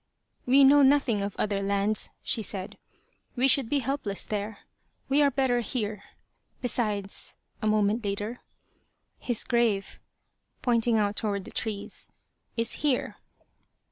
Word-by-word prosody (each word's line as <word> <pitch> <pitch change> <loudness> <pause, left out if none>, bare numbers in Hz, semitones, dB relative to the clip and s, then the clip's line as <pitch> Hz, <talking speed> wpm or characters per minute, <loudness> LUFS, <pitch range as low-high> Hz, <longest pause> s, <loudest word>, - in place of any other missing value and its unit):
"We 270 +2 +6
know 285 +2 +7
nothing 270 -6 +3
of 200 0 -3
other 200 -1 0
lands," 200 +2 0
she 225 - +1
said. 195 -2 -5 0.6
"We 255 +1 +4
should 270 -3 +4
be 290 - +2
helpless 265 -6 -3
there. 210 0 -4 0.5
We 280 +2 +4
are 285 - +5
better 265 -2 +1
here." 215 -3 -3 0.6
"Besides," 210 -5 -2 0.3
a 215 - 0
moment 215 +2 +2
later, 205 +4 -3 0.8
"his 240 -3 -1
grave," 230 -5 0 0.6
pointing 235 -2 +2
out 205 -1 0
toward 200 -3 -1
the - - -9
trees, 210 -3 -5 0.5
"is 230 0 0
here." 285 -4 0
225 Hz, 130 wpm, -27 LUFS, 205-255 Hz, 0.8 s, know